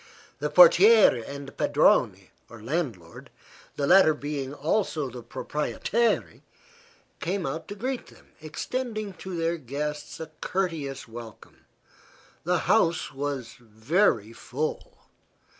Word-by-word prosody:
The 150 Hz, +1 st, -1 dB
portiere 180 Hz, -, +7 dB
and 140 Hz, 0 st, -7 dB
the -, -, -9 dB
padrone, -, -, +2 dB, 0.2 s
or 115 Hz, -, -12 dB
landlord 115 Hz, -, -4 dB, 0.5 s
the 140 Hz, -, -1 dB
latter 175 Hz, -1 st, +6 dB
being 145 Hz, -2 st, -4 dB
also 150 Hz, -1 st, -1 dB
the 125 Hz, 0 st, -8 dB
proprietaire 150 Hz, -, -1 dB, 0.8 s
came 185 Hz, +1 st, -2 dB
out 155 Hz, +4 st, -4 dB
to 205 Hz, -, -7 dB
greet 255 Hz, +4 st, -4 dB
them, -, -, -19 dB
extending 215 Hz, +6 st, -4 dB
to 190 Hz, -1 st, -6 dB
their 165 Hz, +1 st, 0 dB
guests 145 Hz, +2 st, -5 dB
a 160 Hz, -1 st, -7 dB
courteous 165 Hz, -9 st, -3 dB
welcome. 115 Hz, -1 st, -12 dB, 0.8 s
The -, -, +1 dB
house 165 Hz, -3 st, +2 dB
was 135 Hz, -4 st, -4 dB
very 115 Hz, -, 0 dB
full. 140 Hz, +6 st, -5 dB
150 Hz, 115 wpm, -26 LUFS, 130-180 Hz, 0.8 s, portiere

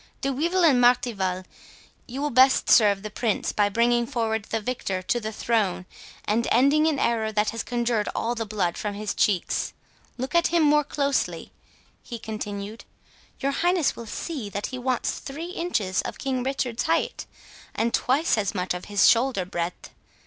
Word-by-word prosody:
—De 275 Hz, -, 0 dB
Wyvil 340 Hz, +7 st, +1 dB
and 265 Hz, -6 st, +5 dB
Martival, 200 Hz, -7 st, +2 dB, 0.6 s
you 265 Hz, +4 st, -5 dB
will 295 Hz, -, -1 dB
best 260 Hz, +2 st, +5 dB
serve 205 Hz, -3 st, +5 dB
the 215 Hz, -, -6 dB
Prince 220 Hz, -1 st, -1 dB
by 205 Hz, -1 st, +2 dB
bringing 235 Hz, +2 st, +2 dB
forward 225 Hz, -4 st, -1 dB
the 225 Hz, -, -2 dB
victor 205 Hz, -5 st, -3 dB
to 240 Hz, +6 st, 0 dB
the 220 Hz, -1 st, -4 dB
throne, 210 Hz, -5 st, 0 dB, 0.4 s
and 225 Hz, +3 st, +1 dB
ending 280 Hz, +6 st, +4 dB
an 310 Hz, -3 st, +1 dB
error 225 Hz, -4 st, 0 dB
that 210 Hz, 0 st, +1 dB
has 230 Hz, -, -4 dB
conjured 235 Hz, -3 st, -1 dB
all 235 Hz, -, -1 dB
the 230 Hz, -1 st, -3 dB
blood 200 Hz, -5 st, -2 dB
from 205 Hz, -1 st, -3 dB
his 210 Hz, 0 st, -3 dB
cheeks.—Look 215 Hz, -, -2 dB
at 340 Hz, -1 st, +4 dB
him 340 Hz, -1 st, +2 dB
more 300 Hz, 0 st, +4 dB
closely," 280 Hz, -1 st, -1 dB, 0.5 s
he 240 Hz, -, -7 dB
continued, 215 Hz, -1 st, -6 dB, 0.6 s
"your 275 Hz, 0 st, +1 dB
highness 345 Hz, +1 st, +1 dB
will 235 Hz, -, -9 dB
see 260 Hz, -2 st, -5 dB
that 205 Hz, +1 st, -4 dB
he 255 Hz, -, -4 dB
wants 250 Hz, -1 st, -1 dB
three 320 Hz, +6 st, -7 dB
inches 280 Hz, -, -1 dB
of -, -, -6 dB
King 265 Hz, -2 st, -2 dB
Richard's 255 Hz, -2 st, -2 dB
height, 325 Hz, +1 st, -1 dB, 0.5 s
and 230 Hz, +1 st, 0 dB
twice 270 Hz, -1 st, +2 dB
as 205 Hz, -1 st, -2 dB
much 180 Hz, -1 st, -1 dB
of 180 Hz, -, -6 dB
his 205 Hz, -1 st, +3 dB
shoulder 235 Hz, -5 st, +3 dB
breadth. 175 Hz, -1 st, -5 dB
235 Hz, 170 wpm, -25 LUFS, 210-270 Hz, 0.6 s, and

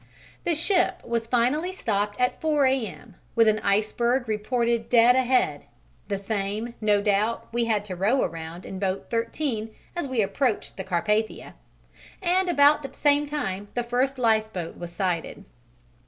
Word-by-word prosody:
The 340 Hz, -, +2 dB
ship 355 Hz, +4 st, +1 dB
was 230 Hz, -1 st, -2 dB
finally 255 Hz, +9 st, +1 dB
stopped 205 Hz, -, -2 dB
at 250 Hz, 0 st, 0 dB
4 300 Hz, -3 st, +2 dB
A.M., 220 Hz, -, -2 dB, 0.2 s
with 230 Hz, -1 st, +5 dB
an 215 Hz, 0 st, +3 dB
iceberg 235 Hz, +5 st, +1 dB
reported 230 Hz, +2 st, 0 dB
dead 240 Hz, +1 st, +6 dB
ahead 260 Hz, 0 st, +1 dB, 0.4 s
(the 200 Hz, -, -1 dB
same 205 Hz, +3 st, -3 dB
no 205 Hz, -1 st, +3 dB
doubt 210 Hz, +2 st, +1 dB
we 235 Hz, 0 st, +1 dB
had 215 Hz, -3 st, 0 dB
to 190 Hz, -3 st, -5 dB
row 210 Hz, +9 st, +2 dB
around 165 Hz, +2 st, -6 dB
in 190 Hz, -, -6 dB
boat 190 Hz, -1 st, -2 dB
13 230 Hz, 0 st, -2 dB, 0.3 s
as 345 Hz, -5 st, -2 dB
we 250 Hz, -5 st, +1 dB
approached 215 Hz, +3 st, -1 dB
the 190 Hz, -, -5 dB
Carpathia), 210 Hz, +4 st, -1 dB, 0.7 s
and 370 Hz, 0 st, +1 dB
about 290 Hz, -2 st, +5 dB
the 275 Hz, -, -7 dB
same 290 Hz, 0 st, +2 dB
time 205 Hz, -10 st, -3 dB
the 245 Hz, -, 0 dB
first 255 Hz, +3 st, 0 dB
lifeboat 220 Hz, -7 st, 0 dB
was 175 Hz, 0 st, -8 dB
sighted. 180 Hz, +2 st, -3 dB
230 Hz, 155 wpm, -25 LUFS, 205-260 Hz, 0.7 s, dead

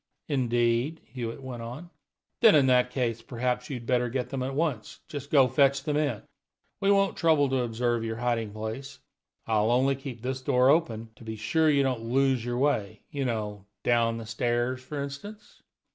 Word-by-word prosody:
"Indeed?" 120 Hz, +2 st, +1 dB
Hewitt 120 Hz, +2 st, -6 dB
went 125 Hz, -3 st, -6 dB
on. 130 Hz, +10 st, -8 dB, 0.5 s
"Then, 225 Hz, -6 st, +7 dB
in 140 Hz, -3 st, +5 dB
that 125 Hz, -1 st, +4 dB
case, 120 Hz, -3 st, -1 dB
perhaps 125 Hz, +1 st, -2 dB
you'd 125 Hz, -4 st, -5 dB
better 125 Hz, 0 st, +1 dB
get 125 Hz, 0 st, -3 dB
them 135 Hz, -2 st, -2 dB
at 135 Hz, +1 st, -3 dB
once. 140 Hz, -9 st, -2 dB
Just 145 Hz, -3 st, -7 dB
go 140 Hz, -3 st, +6 dB
and 130 Hz, -, -5 dB
fetch 140 Hz, 0 st, +3 dB
them 150 Hz, 0 st, -1 dB
in; 145 Hz, -7 st, 0 dB, 0.6 s
we 195 Hz, -, +1 dB
won't 195 Hz, -1 st, +3 dB
trouble 155 Hz, -4 st, +3 dB
to 130 Hz, 0 st, +1 dB
observe 120 Hz, 0 st, -1 dB
your 110 Hz, 0 st, -3 dB
hiding 115 Hz, -2 st, -1 dB
place. 110 Hz, +6 st, -6 dB, 0.5 s
I'll 110 Hz, -1 st, +2 dB
only 130 Hz, +3 st, +3 dB
keep 130 Hz, -4 st, -8 dB
this 130 Hz, +1 st, -3 dB
door 125 Hz, 0 st, +3 dB
open, 115 Hz, -9 st, 0 dB
to -, -, -14 dB
be 110 Hz, 0 st, -5 dB
sure 155 Hz, +9 st, +2 dB
you 140 Hz, -2 st, +4 dB
don't 130 Hz, -4 st, -1 dB
lose 130 Hz, +1 st, +1 dB
your 120 Hz, 0 st, -2 dB
way, 110 Hz, -7 st, 0 dB
you 140 Hz, -2 st, -2 dB
know 105 Hz, -4 st, -3 dB, 0.2 s
down 115 Hz, -1 st, +2 dB
the 115 Hz, -, -7 dB
stairs, 120 Hz, +3 st, -1 dB
for 145 Hz, +3 st, -6 dB
instance." 170 Hz, +10 st, -9 dB
125 Hz, 190 wpm, -28 LUFS, 115-140 Hz, 0.6 s, Then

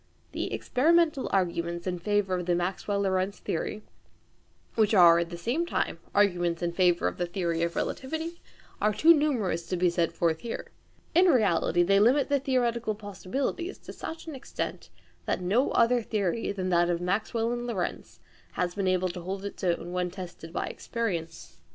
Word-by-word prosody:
The -, -, -3 dB
experimental 315 Hz, +1 st, +2 dB
arguments 170 Hz, -2 st, -1 dB
in 180 Hz, -2 st, -2 dB
favour 205 Hz, 0 st, 0 dB
of 180 Hz, -1 st, -2 dB
the 175 Hz, -, +3 dB
Maxwell 190 Hz, +3 st, -1 dB
Lorentz 190 Hz, 0 st, 0 dB
theory, 210 Hz, +5 st, -3 dB, 0.9 s
which 220 Hz, -1 st, +3 dB
are 170 Hz, -3 st, +8 dB
at 170 Hz, -1 st, -2 dB
the 170 Hz, -, -6 dB
same 240 Hz, -, -1 dB
time 345 Hz, -, -2 dB, 0.2 s
arguments 175 Hz, -4 st, +2 dB
in 170 Hz, -, 0 dB
favour 175 Hz, -1 st, +2 dB
of -, -, -3 dB
the 175 Hz, -, 0 dB
theory 170 Hz, -2 st, -1 dB
of 170 Hz, 0 st, -1 dB
relativity, 320 Hz, +5 st, -3 dB, 0.4 s
are 210 Hz, 0 st, +3 dB
too 330 Hz, +7 st, +7 dB
numerous 230 Hz, -, 0 dB
to 180 Hz, -, -1 dB
be 175 Hz, 0 st, +3 dB
set 170 Hz, -1 st, +1 dB
forth 165 Hz, -2 st, 0 dB
here. 235 Hz, -, -6 dB, 0.4 s
In 355 Hz, +3 st, +6 dB
reality 200 Hz, -, +3 dB
they 195 Hz, +3 st, +4 dB
limit 255 Hz, +7 st, +4 dB
the 285 Hz, -1 st, +3 dB
theoretical 240 Hz, -5 st, 0 dB
possibilities 215 Hz, -, -4 dB
to -, -, -11 dB
such 320 Hz, -, -7 dB
an 320 Hz, -, -6 dB
extent, 265 Hz, -, -5 dB, 0.4 s
that -, -, 0 dB
no 200 Hz, +9 st, +2 dB
other 240 Hz, +1 st, +4 dB
theory 210 Hz, -1 st, -1 dB
than 185 Hz, -2 st, -3 dB
that 175 Hz, -1 st, +3 dB
of 170 Hz, -1 st, 0 dB
Maxwell 220 Hz, +5 st, -1 dB
and 240 Hz, 0 st, -3 dB
Lorentz 195 Hz, -7 st, -4 dB, 0.3 s
has 175 Hz, -1 st, -1 dB
been 195 Hz, -1 st, -1 dB
able 185 Hz, 0 st, +2 dB
to 175 Hz, 0 st, -6 dB
hold 190 Hz, +3 st, -5 dB
its 200 Hz, -, -7 dB
own 175 Hz, -1 st, 0 dB
when 180 Hz, 0 st, -1 dB
tested 175 Hz, -3 st, -9 dB
by -, -, -2 dB
experience. 165 Hz, -, -4 dB
195 Hz, 175 wpm, -28 LUFS, 175-235 Hz, 0.9 s, are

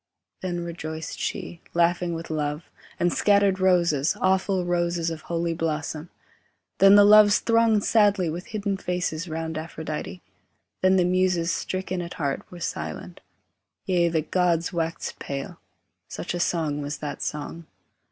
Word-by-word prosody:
Then 175 Hz, -2 st, -3 dB
rejoiced 160 Hz, -2 st, -6 dB
she, 170 Hz, -, -4 dB
laughing 170 Hz, 0 st, +2 dB
with 165 Hz, 0 st, -6 dB
love, 150 Hz, +1 st, -3 dB, 0.3 s
and 175 Hz, 0 st, +2 dB
scattered 200 Hz, -2 st, +3 dB
Roses, 170 Hz, -6 st, +2 dB
awful 190 Hz, 0 st, +1 dB
roses 175 Hz, -1 st, 0 dB
of 160 Hz, -1 st, -6 dB
holy 170 Hz, 0 st, -2 dB
blossom; 160 Hz, 0 st, -3 dB, 0.7 s
Then 195 Hz, +1 st, +8 dB
the 205 Hz, -, +8 dB
Loves 210 Hz, 0 st, +7 dB
thronged 230 Hz, -2 st, +3 dB
sadly 205 Hz, -5 st, +3 dB
with 170 Hz, +3 st, -5 dB
hidden 205 Hz, -3 st, -2 dB
faces 180 Hz, -3 st, -2 dB
Round 160 Hz, 0 st, -3 dB
Aphrodite, 160 Hz, +2 st, -6 dB, 0.6 s
Then 185 Hz, 0 st, +4 dB
the 180 Hz, -2 st, +3 dB
Muses, 180 Hz, -2 st, +1 dB
stricken 185 Hz, -1 st, -3 dB
at 170 Hz, 0 st, -7 dB
heart, 140 Hz, -4 st, -2 dB
were 175 Hz, -, -9 dB
silent; -, -, -5 dB, 0.6 s
Yea, 175 Hz, -2 st, +2 dB
the 160 Hz, -2 st, 0 dB
gods 175 Hz, +1 st, +1 dB
waxed 165 Hz, -1 st, -3 dB
pale; 140 Hz, +5 st, -6 dB, 0.5 s
such 175 Hz, -, -5 dB
a 175 Hz, -, -3 dB
song 155 Hz, -4 st, 0 dB
was 145 Hz, +1 st, -4 dB
that 145 Hz, -1 st, -6 dB
song. 155 Hz, +2 st, -5 dB
170 Hz, 140 wpm, -25 LUFS, 160-185 Hz, 0.7 s, Then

